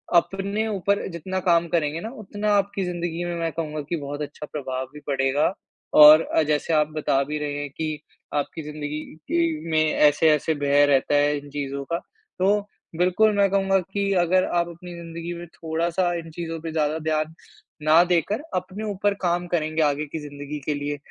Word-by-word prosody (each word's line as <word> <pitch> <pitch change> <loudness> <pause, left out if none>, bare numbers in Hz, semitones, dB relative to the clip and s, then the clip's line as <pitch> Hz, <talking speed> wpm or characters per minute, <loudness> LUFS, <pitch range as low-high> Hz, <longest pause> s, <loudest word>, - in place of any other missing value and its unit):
अपने 195 +5 +1
ऊपर 200 -1 0
जितना 185 +3 -3
काम 170 0 +4
करेंगे 160 -1 0
ना, 220 - -5
उतना 210 -3 -2
आपकी 200 -1 0
ज़िंदगी 175 -1 -3
में 175 0 -3
मैं 165 -1 -1
कहूँगा 155 -2 -3
कि 175 - 0
बहुत 145 0 -5
अच्छा 150 +1 -6
प्रभाव 130 -3 -3
भी 150 - -9
पड़ेगा 135 +4 +1 0.5
और 150 +1 +11
अ, 160 - +1
जैसे 150 +2 0
आप 150 -1 +3
बता 145 -3 +1
भी 150 +2 -4
रहे 150 -1 -3
हैं 145 - -4
कि 155 -2 -2 0.4
आपकी 145 +2 -2
ज़िंदगी 150 0 -5 0.3
के 330 - 0
में 155 0 +4
ऐसे-ऐसे 150 +1 +4
भय 145 0 +4
रहता 140 +1 +3
है 145 0 +3
इन 145 0 -9
चीज़ों 140 -1 -4
का। 170 +3 -1 0.4
तो 200 +3 +3 0.4
बिल्कुल 185 +5 +3
मैं 200 -1 +4
कहूँगा 195 -1 +3
कि 200 -1 0
अगर 185 +2 +3
आप 170 0 0
अपनी 175 +1 -10
ज़िंदगी 170 0 -6
में 175 - -7
थोड़ा-सा 170 +2 -1
इन 165 0 -9
चीज़ों 165 0 -5
पे 165 -1 -5
ज़्यादा 155 0 0
ध्यान 155 0 -1 0.5
ना 155 +3 +6
देकर 180 - +1
अपने 190 +3 -4
ऊपर 205 +1 +1
काम 175 0 0
करेंगे 160 -2 0
आगे 145 0 +1
की 150 +2 -6
ज़िंदगी 145 0 -7
के 150 - 0
लिए, 145 0 -3
160 Hz, 185 wpm, -24 LUFS, 150-180 Hz, 0.5 s, और